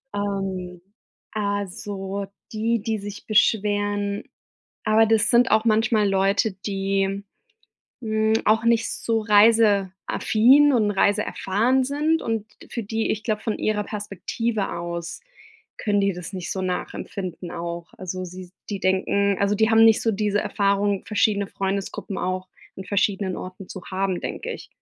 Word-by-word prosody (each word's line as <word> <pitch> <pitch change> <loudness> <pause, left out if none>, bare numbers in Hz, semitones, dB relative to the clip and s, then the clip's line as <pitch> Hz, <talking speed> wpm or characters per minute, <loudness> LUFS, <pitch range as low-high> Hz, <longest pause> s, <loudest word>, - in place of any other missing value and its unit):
ähm, 190 -3 -3 0.5
also 200 -1 -3 0.3
die, 225 0 0
die 220 0 -1
sich 205 0 -8
beschweren 205 -1 +1 0.6
aber 220 +1 +5
das 220 -1 +3
sind 240 +2 +4
auch 220 +1 +3
manchmal 220 -1 +3
Leute, 195 +2 +2
die, 195 0 -1 0.8
hm, 220 -1 +1
auch 220 +2 +3
nicht 230 -1 +2
so 225 -1 -1
reiseaffin 215 +5 +4
und 215 -4 +2
reiseerfahren 210 +5 +1
sind 305 +4 +1
und 225 -2 -2 0.2
für 235 - -4
die 220 +2 -2
ich 215 +1 -3
glaube, 215 -2 -1
von 220 - -2
ihrer 210 -1 0
Perspektive 210 +1 -3
aus, 170 - -5 0.6
können 205 -1 +1
die 200 0 +2
das 175 +2 -8
nicht 185 -2 -5
so 190 -2 -2
nachempfinden 180 -1 -4
auch. 170 0 -6
Also, 185 0 -5
sie 185 +1 -9
s 180 - -16 0.2
die 200 -2 -3
denken 195 +1 +1
also 200 +1 +2
die 220 +1 +3
haben 225 0 +7
nicht 220 -1 +5
so 225 - +1
diese 205 0 0
Erfahrung, 200 -1 0
verschiedene 205 -1 +1
Freundesgruppen 195 0 -3
auch 185 0 -3 0.3
an 190 - -6
verschiedenen 195 -1 0
Orten 185 +1 -9
zu 190 - -7
haben, 190 -1 -1
denke - - -4
ich. - - -8
205 Hz, 145 wpm, -23 LUFS, 195-220 Hz, 0.8 s, haben